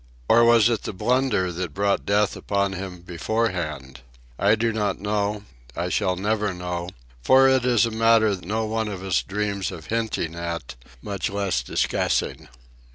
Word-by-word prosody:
Or 120 +1 +6
was 115 -1 +6
it 115 -3 0
the - - -5
blunder 110 -2 +1
that 85 -3 -5
brought 100 0 0
death 100 -1 +2
upon 100 -1 -1
him 95 -2 -7
beforehand? 85 - -3 0.4
I 100 +2 +4
do 115 +1 0
not 105 -3 -1
know, 105 0 -1 0.3
I 85 +2 -2
shall 95 -1 +1
never 105 0 -1
know; 90 -1 -4 0.3
for 130 - +6
it 130 -2 +3
is 120 -3 +4
a 115 - -3
matter 110 -2 +4
no 110 +5 -2
one 110 0 -1
of 95 -3 -6
us 95 -1 +1
dreams 100 -1 -2
of 80 -4 -9
hinting 110 -8 -1
at, 85 -5 -5 0.3
much 100 -2 -3
less 100 -1 -1
discussing. - - -1
100 Hz, 160 wpm, -24 LUFS, 90-110 Hz, 0.4 s, Or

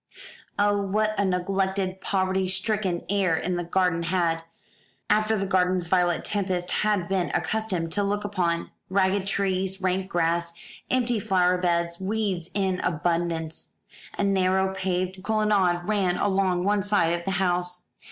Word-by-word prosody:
Oh, 205 0 +2
what 215 +2 0
a - - +3
neglected, 190 0 -1
poverty 190 -1 0
stricken 190 -2 -1
air 190 -5 +1
the 175 -1 -1
garden 175 -1 +1
had, 170 -1 0 0.7
after 215 +1 +3
the 195 - -1
gardens 185 -1 +2
Violet 175 -2 +2
Tempest 185 -3 -1
had 210 -5 +1
been 190 -2 0
accustomed 190 -7 -1
to 205 +4 0
look 205 +1 -1
upon! 175 -5 -1 0.2
Ragged 190 0 +1
trees, 190 -1 -1
rank 190 0 -1
grass, 170 0 0 0.4
empty 245 -3 +1
flower 185 -3 +2
beds, 170 -1 0
weeds 190 -4 -2
in 190 -2 0
abundance. 165 -1 -2 0.4
A - - 0
narrow 190 -1 +2
paved 185 0 -2
colonnade 200 -4 +2
ran 195 -4 +1
along 190 -3 +1
one 205 +1 +2
side 195 -4 +2
of 170 0 -2
the 195 - -2
house. 180 -1 -1
185 Hz, 140 wpm, -25 LUFS, 175-200 Hz, 0.7 s, a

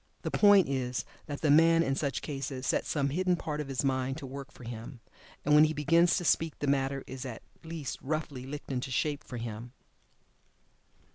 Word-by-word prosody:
The - - -2
point 205 -3 +6
is 125 -5 -2 0.2
that 145 -2 -5
the 150 - +3
man, 165 +2 +6
in 135 - 0
such 140 0 -2
cases, 135 -2 -4
sets - - 0
some 140 -2 +1
hidden 180 +5 +1
part 150 -3 -3
of 150 - -6
his 135 0 -2
mind 130 0 0
to 145 - -7
work 140 +2 -8
for - - -14
him, 115 +2 -7 0.5
and 150 - +3
when 150 +1 +8
he 155 0 -1
begins 165 +4 +4
to 175 - -3
speak 165 -1 +2
the - - -3
matter 135 -1 0
is 130 0 -7
at 125 -4 -7 0.2
least 160 -3 -5
roughly 140 -3 -3
"licked 145 0 -7
into 130 0 -2
shape 145 +3 -1
for 125 - -7
him." 115 +1 -6
140 Hz, 200 wpm, -30 LUFS, 130-155 Hz, 0.5 s, when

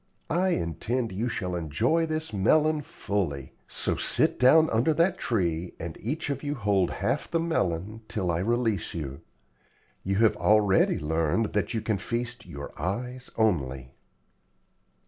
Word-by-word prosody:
I 180 +4 +2
intend 110 +9 -2
you 110 +6 -2
shall 90 -6 -3
enjoy 115 - +1
this 155 -3 -3
melon 155 +10 +3
fully. 85 - -3
So - - -1
sit - - +1
down 155 +6 +6
under 125 +8 +2
that 175 +3 +2
tree 90 -6 -1
and 80 -1 -5
each 145 +5 -2
of 140 -1 -3
you 145 0 -2
hold 100 -6 +1
half 135 +4 -2
the 165 - +1
melon 110 - -1
till 95 -5 -1
I 85 - 0
release 115 -3 0
you. 70 -4 -5 0.8
You 95 +1 0
have 110 +1 +4
already 105 -2 +4
learned 80 +7 0
that 105 +1 0
you 110 - 0
can 105 -3 -1
feast 120 +3 -4
your 70 0 -7
eyes 125 +8 -3
only." 70 - 0
110 Hz, 145 wpm, -27 LUFS, 85-130 Hz, 0.8 s, down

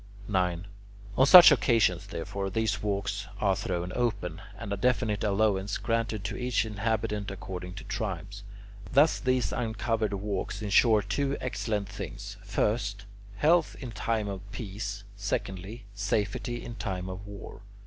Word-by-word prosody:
9. 90 -3 0 0.5
On 130 - +5
such 180 +3 +11
occasions, 110 -8 +3
therefore, 95 +4 -4
these 110 +3 0
walks 100 -1 -2
are 100 -2 +2
thrown 90 -1 -3
open, 100 -7 -1 0.2
and 105 -2 -4
a - - +1
definite 110 -1 +1
allowance 100 -1 +1
granted 115 -3 -1
to 100 - -3
each 125 -1 0
inhabitant 105 -1 -1
according 90 -2 -6
to - - -8
tribes. 100 -2 -4 0.5
Thus 145 +4 +5
these 130 -6 +1
uncovered 110 -2 -1
walks 100 +1 -3
insure 105 +1 +4
two 135 +7 -1
excellent 105 -3 -2
things: 100 +1 -7
first, 100 +1 -1 0.3
health 160 +9 +3
in 125 -4 -6
time 110 0 -1
of 100 -2 -4
peace; 100 -1 -5
secondly, 100 +2 -4
safety 105 +4 -2
in 120 - -6
time 95 -4 -3
of 95 +2 -7
war. 100 -1 -9
105 Hz, 140 wpm, -29 LUFS, 100-115 Hz, 0.5 s, such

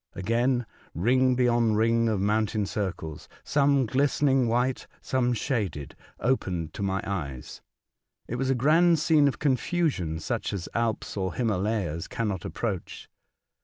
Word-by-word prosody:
Again 120 +5 +1 0.3
ring 130 - +3
beyond 120 -3 +2
ring 115 +1 +3
of 105 -3 0
mountain 105 +1 +1
circles 95 -7 -4
— - - -33
some 140 -2 +4
glistening 135 +1 +2
white, 125 +3 0
some 125 -2 0
shaded 105 - -2 0.2
— - - -35
opened 90 -11 -1
to - - -7
my 95 0 -1
eyes. 70 -10 -5 0.7
It 120 - -3
was 130 +1 -1
a 135 - +3
grand 165 +7 +4
scene 155 -1 +4
of 140 - -1
confusion 135 - 0
such 80 - -3
as 95 -3 -4
Alps 115 -2 -1
or 95 -2 -2
Himalayas 100 -7 -1
cannot 100 -7 -3
approach. 100 -7 -4
115 Hz, 140 wpm, -27 LUFS, 95-130 Hz, 0.7 s, some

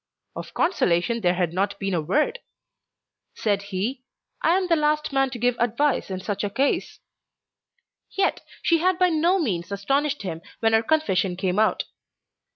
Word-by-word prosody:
Of - - -8
consolation 230 - +1
there 180 -2 +2
had 175 -2 -1
not 200 +2 -1
been 195 -1 -2
a 170 - +1
word. 305 - 0 1.0
Said 205 -2 0
he, 200 +6 -3 0.4
"I 340 +3 +3
am 380 -1 -1
the 335 - +4
last 300 -1 0
man 270 -1 +2
to 250 - -6
give 245 +1 +1
advice 245 +4 +1
in 190 -1 -3
such 205 +1 -3
a 205 - 0
case". 270 +7 0 1.1
Yet 390 0 0 0.2
she 335 -1 +3
had 365 +2 +2
by 365 0 +4
no 340 +3 +2
means 200 - -2
astonished 275 +8 0
him 165 -4 -5 0.2
when 225 -1 +2
her 220 - +5
confession 200 - +1
came 185 +1 -1
out. 220 - +2
230 Hz, 165 wpm, -24 LUFS, 190-305 Hz, 1.1 s, her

